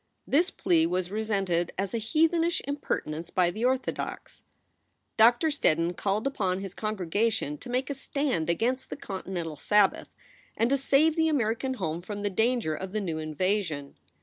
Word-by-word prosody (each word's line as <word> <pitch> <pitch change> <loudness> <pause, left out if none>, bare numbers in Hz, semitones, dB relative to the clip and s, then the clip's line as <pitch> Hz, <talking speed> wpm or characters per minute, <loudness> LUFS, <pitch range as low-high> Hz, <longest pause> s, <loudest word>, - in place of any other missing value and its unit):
This 335 +7 +3
plea 165 - +2
was 180 +1 -1
resented 195 -5 0
as 195 0 -2
a 230 - 0
heathenish 325 +8 +2
impertinence 170 - -3
by 180 -2 +2
the 215 +6 -5
orthodox. 260 +1 -2 0.7
Doctor 240 +7 +5
Steddon 170 - +1
called 205 +5 -1
upon 195 -9 0
his 195 -1 -6
congregation 215 -4 -1
to 250 - -9
make 255 +2 0
a 285 - -2
stand 270 - -1
against 250 +9 0
the - - -5
"continental 185 - -5
Sabbath" 210 +3 +2 0.5
and 230 +3 +2
to 275 - +4
save 285 +4 +3
the 320 -1 +2
American 260 -1 0
home 165 -6 -3
from 205 +2 -6
the 205 - 0
danger 225 -4 +1
of 190 +4 -6
the 215 - 0
new 165 -5 -3
invasion. 155 -2 -1
210 Hz, 160 wpm, -28 LUFS, 175-260 Hz, 0.7 s, Doctor